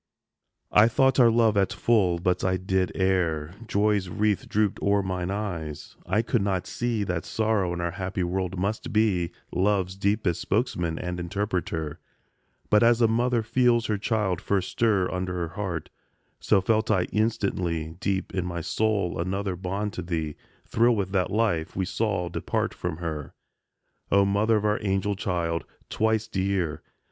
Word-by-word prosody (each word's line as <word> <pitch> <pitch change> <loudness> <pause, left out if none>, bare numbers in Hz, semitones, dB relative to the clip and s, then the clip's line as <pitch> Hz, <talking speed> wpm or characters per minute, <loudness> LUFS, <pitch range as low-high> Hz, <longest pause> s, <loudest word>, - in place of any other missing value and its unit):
XXVII. 105 - +6
I 110 - +7
thought 135 +3 +3
our 120 -2 +7
love 115 -2 +3
at 100 -1 +2
full, 100 -7 +2
but 90 +1 0
I 95 0 +2
did 95 0 0
err; 90 -5 0
Joy's 105 -3 +1
wreath 105 +2 0
drooped 105 -1 +1
o'er 100 0 +2
mine 90 -1 -2
eyes; 90 -7 -4
I 105 +5 +2
could 120 -1 +1
not 95 -2 0
see 120 -3 -1
That 90 -4 -2
sorrow 110 -5 0
in 85 0 -3
our 85 0 -1
happy 95 0 -3
world 90 +1 -2
must 100 +4 -2
be 100 -6 +2 0.2
Love's 95 -1 +1
deepest 100 -3 0
spokesman 85 -2 -1
and 90 0 -4
interpreter; 85 -4 -3 0.7
But, 105 - +6
as 120 0 +5
a 115 - +5
mother 120 +1 +1
feels 120 0 +2
her 105 -2 -1
child 105 -4 0
first 95 -2 -1
stir 105 -6 +2
Under 90 0 -2
her 85 -2 -2
heart, 90 -3 -4 0.5
so 95 - +3
felt 110 +3 +1
I 100 -5 +3
instantly 90 -7 -1
Deep 95 -1 -2
in 95 - -1
my 85 -1 -4
soul 100 -1 0
another 95 +2 -2
bond 100 +3 -3
to - - -4
thee 80 -3 -3 0.3
Thrill 120 +1 +3
with 95 -3 -2
that 95 -2 +1
life 105 -7 0
we 95 - 0
saw 100 -3 -1
depart 85 - -2
from 80 - -4
her; 80 -4 -5 0.8
O 100 0 +5
mother 105 +3 +2
of 105 - -2
our 105 0 +2
angel 95 0 0
child! 85 -4 -1 0.3
twice 110 0 +1
dear! 95 -5 -1
95 Hz, 165 wpm, -26 LUFS, 90-105 Hz, 0.8 s, I